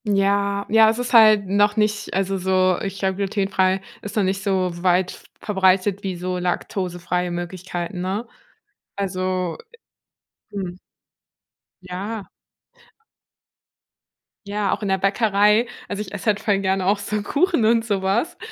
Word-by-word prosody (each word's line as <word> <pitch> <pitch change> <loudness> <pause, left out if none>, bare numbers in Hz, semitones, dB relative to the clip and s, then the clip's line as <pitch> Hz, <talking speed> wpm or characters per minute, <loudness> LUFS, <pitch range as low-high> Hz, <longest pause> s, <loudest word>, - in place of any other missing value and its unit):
Ja, 200 0 +1
ja, 220 0 +6
das 220 +1 +2
ist 245 0 -3
halt 215 -3 +7
noch 205 +2 +2
nicht 210 -1 0
also 195 0 0
so, 185 0 +2
ich 195 0 -4
glaube, 190 -1 -1
glutenfrei 195 -1 +1 0.2
ist 205 - -7
noch 210 - +2
nicht 190 +1 -1
so 190 -2 0
weit 180 0 +2
v - - -13 0.2
verbreitet 190 -1 +2
wie 190 -2 -3
so 180 +1 -3
laktosefreie 180 -1 -2
Möglichkeiten, 175 +1 -5
ne? 195 +6 -3 0.7
Also 185 -3 -2 1.0
Mhm. 185 -3 -5 1.1
Ja. 195 +4 -5 2.2
Ja, 205 -1 -1
auch - - -4
in 205 - -2
der 190 0 +2
Bäckerei, 210 +3 +3 0.2
also 205 0 -4
ich 205 - -7
esse 205 - -6
halt 210 -1 +3
voll 205 -2 +1
gerne 190 -1 0
auch 200 +1 +3
so 205 +1 -3
Kuchen 310 - +1
und 225 +1 +3
so 200 -4 -1
was. 200 - 0
195 Hz, 145 wpm, -22 LUFS, 185-210 Hz, 2.2 s, halt